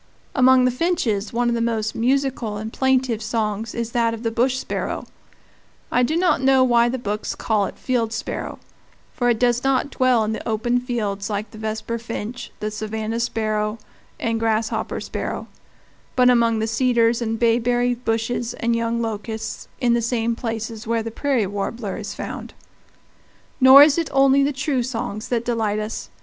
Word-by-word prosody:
Among 260 Hz, -1 st, +5 dB
the 250 Hz, -, +3 dB
finches 245 Hz, -, 0 dB
one 240 Hz, +1 st, 0 dB
of 240 Hz, -, +2 dB
the 230 Hz, -, 0 dB
most 220 Hz, -2 st, -1 dB
musical 255 Hz, -3 st, 0 dB
and 220 Hz, +2 st, -6 dB
plaintive 260 Hz, -4 st, +1 dB
songs 220 Hz, -1 st, -2 dB
is 235 Hz, -1 st, -3 dB
that 230 Hz, -1 st, +1 dB
of 225 Hz, -, -10 dB
the 230 Hz, -, 0 dB
bush 250 Hz, +3 st, +1 dB
sparrow -, -, -3 dB, 0.9 s
I 250 Hz, -, +3 dB
do 275 Hz, +6 st, +1 dB
not 350 Hz, -5 st, +2 dB
know 265 Hz, 0 st, +5 dB
why 240 Hz, -1 st, +4 dB
the 260 Hz, -, -2 dB
books 210 Hz, -3 st, -3 dB
call 210 Hz, -3 st, 0 dB
it -, -, -10 dB
field 235 Hz, -3 st, -1 dB
sparrow, 220 Hz, -, -4 dB, 0.6 s
for 245 Hz, -1 st, +1 dB
it 235 Hz, -, +2 dB
does 245 Hz, +1 st, +2 dB
not 270 Hz, +1 st, +1 dB
dwell 255 Hz, -4 st, +3 dB
in 215 Hz, -, -1 dB
the 220 Hz, -, -4 dB
open 240 Hz, +3 st, +1 dB
fields 215 Hz, -5 st, -3 dB
like 205 Hz, 0 st, -3 dB
the 215 Hz, -, -11 dB
vesperfinch, 230 Hz, +2 st, -4 dB
the 215 Hz, 0 st, -2 dB
savannah 220 Hz, +1 st, -3 dB
sparrow, 215 Hz, -2 st, -1 dB, 0.4 s
and 225 Hz, 0 st, -1 dB
grasshopper 225 Hz, 0 st, -1 dB
sparrow, -, -, -4 dB, 0.7 s
but 250 Hz, -1 st, +5 dB
among 230 Hz, -2 st, +3 dB
the 220 Hz, -, 0 dB
cedars 235 Hz, 0 st, +2 dB
and 225 Hz, -1 st, -1 dB
bayberry 240 Hz, +1 st, +2 dB
bushes 235 Hz, 0 st, -2 dB
and 235 Hz, 0 st, 0 dB
young 230 Hz, 0 st, -1 dB
locusts 220 Hz, 0 st, -5 dB
in 240 Hz, -2 st, +3 dB
the 235 Hz, -, +2 dB
same 235 Hz, 0 st, 0 dB
places 225 Hz, -1 st, -5 dB
where 230 Hz, -1 st, 0 dB
the 230 Hz, -, -5 dB
prairie 260 Hz, -2 st, 0 dB
warbler 200 Hz, +1 st, -4 dB
is 210 Hz, -, -6 dB
found. -, -, -7 dB, 1.0 s
Nor 265 Hz, +1 st, +10 dB
is 295 Hz, +2 st, +4 dB
it 330 Hz, -, -2 dB
only 275 Hz, 0 st, +5 dB
the 280 Hz, +1 st, +2 dB
true 270 Hz, -1 st, -1 dB
songs 225 Hz, -3 st, -4 dB
that 240 Hz, -1 st, -1 dB
delight 225 Hz, -3 st, 0 dB
us. 215 Hz, +1 st, -4 dB
230 Hz, 175 wpm, -22 LUFS, 220-250 Hz, 1.0 s, Nor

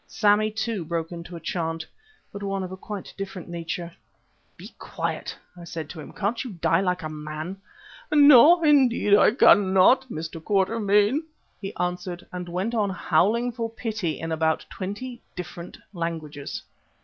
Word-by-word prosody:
Sammy, 215 Hz, 0 st, +3 dB
too, 220 Hz, -3 st, -3 dB
broke 165 Hz, 0 st, -3 dB
into 170 Hz, 0 st, -8 dB
a -, -, -6 dB
chant, 165 Hz, -1 st, -3 dB, 0.5 s
but 200 Hz, -, -7 dB
one 195 Hz, -1 st, -2 dB
of 185 Hz, -, -6 dB
quite 205 Hz, -3 st, -7 dB
a -, -, -26 dB
different 195 Hz, -3 st, -6 dB
nature. 170 Hz, 0 st, -5 dB, 0.6 s
"Be -, -, -11 dB
quiet!" -, -, -4 dB, 0.2 s
I 175 Hz, -, -11 dB
said 160 Hz, -3 st, -6 dB
to 165 Hz, -, -9 dB
him. 150 Hz, -, -9 dB
"Can't 215 Hz, +4 st, -2 dB
you 250 Hz, -5 st, -7 dB
die 170 Hz, 0 st, +2 dB
like 180 Hz, -2 st, -1 dB
a -, -, -2 dB
man?" 155 Hz, +4 st, -6 dB, 0.5 s
"No, 295 Hz, +3 st, +8 dB
indeed 260 Hz, -8 st, +4 dB
I -, -, +6 dB
cannot, 205 Hz, +3 st, +5 dB
Mr. 165 Hz, -3 st, -6 dB
Quatermain," 205 Hz, -, +2 dB, 0.4 s
he 195 Hz, -1 st, -4 dB
answered, 180 Hz, 0 st, -3 dB
and 180 Hz, -1 st, -5 dB
went 185 Hz, +7 st, -2 dB
on 210 Hz, -3 st, +1 dB
howling 200 Hz, +7 st, +1 dB
for 230 Hz, -1 st, -3 dB
pity 215 Hz, -7 st, -3 dB
in 165 Hz, 0 st, -4 dB
about 160 Hz, 0 st, 0 dB
twenty 235 Hz, +6 st, -6 dB
different 175 Hz, -1 st, -8 dB, 0.2 s
languages. 160 Hz, -5 st, -5 dB
185 Hz, 155 wpm, -25 LUFS, 170-215 Hz, 0.6 s, No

